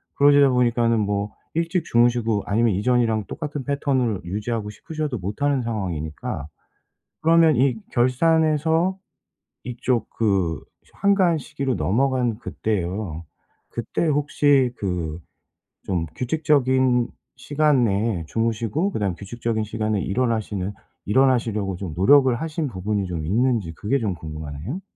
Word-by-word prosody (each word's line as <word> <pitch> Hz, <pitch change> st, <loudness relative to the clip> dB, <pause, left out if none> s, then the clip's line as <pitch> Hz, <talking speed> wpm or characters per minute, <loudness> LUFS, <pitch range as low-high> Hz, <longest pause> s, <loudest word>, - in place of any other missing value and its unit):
그러시다 145 Hz, -1 st, +6 dB
보니까는 120 Hz, -2 st, +2 dB
뭐 100 Hz, 0 st, -1 dB, 0.2 s
일찍 170 Hz, +1 st, 0 dB
주무시고 120 Hz, -4 st, +2 dB
아니면 110 Hz, +1 st, +2 dB
이전이랑 115 Hz, 0 st, +1 dB
똑같은 150 Hz, -3 st, -5 dB
패턴을 130 Hz, -7 st, 0 dB
유지하고 105 Hz, +4 st, -3 dB
싶으셔도 155 Hz, +4 st, -4 dB
못 100 Hz, +6 st, -6 dB
하는 145 Hz, -2 st, +2 dB
상황이니까. 85 Hz, -10 st, -4 dB, 0.7 s
그러면 165 Hz, -1 st, +5 dB
이 130 Hz, 0 st, +3 dB, 0.2 s
결산에서 160 Hz, +7 st, +2 dB, 0.7 s
이쪽 125 Hz, 0 st, -1 dB
그 95 Hz, -7 st, 0 dB, 0.3 s
한가한 190 Hz, -4 st, +3 dB
시기로 140 Hz, -4 st, -3 dB
넘어간 120 Hz, -, +1 dB
그때요. 95 Hz, -7 st, -3 dB, 0.4 s
그때 120 Hz, +8 st, -2 dB
혹시 145 Hz, -3 st, +3 dB
그 85 Hz, -5 st, -3 dB, 0.7 s
좀 90 Hz, -4 st, 0 dB
규칙적인 130 Hz, -3 st, +2 dB, 0.3 s
시간 145 Hz, -1 st, +2 dB
내에 100 Hz, -4 st, 0 dB
주무시고 115 Hz, -, -1 dB
그다음에 100 Hz, -, -1 dB
규칙적인 115 Hz, +2 st, -3 dB
시간에 110 Hz, -1 st, -1 dB
일어나시는 105 Hz, -3 st, -1 dB, 0.3 s
일어나시려고 110 Hz, -5 st, +1 dB
좀 90 Hz, -4 st, -5 dB
노력을 130 Hz, +8 st, +5 dB
하신 160 Hz, +3 st, -3 dB
부분이 100 Hz, -2 st, -2 dB
좀 85 Hz, -3 st, -4 dB
있는지 110 Hz, -1 st, +1 dB
그게 105 Hz, -, -1 dB
좀 110 Hz, -7 st, -1 dB
궁금하네요. 80 Hz, -, -6 dB
120 Hz, 310 characters per minute, -23 LUFS, 100-140 Hz, 0.7 s, 그러시다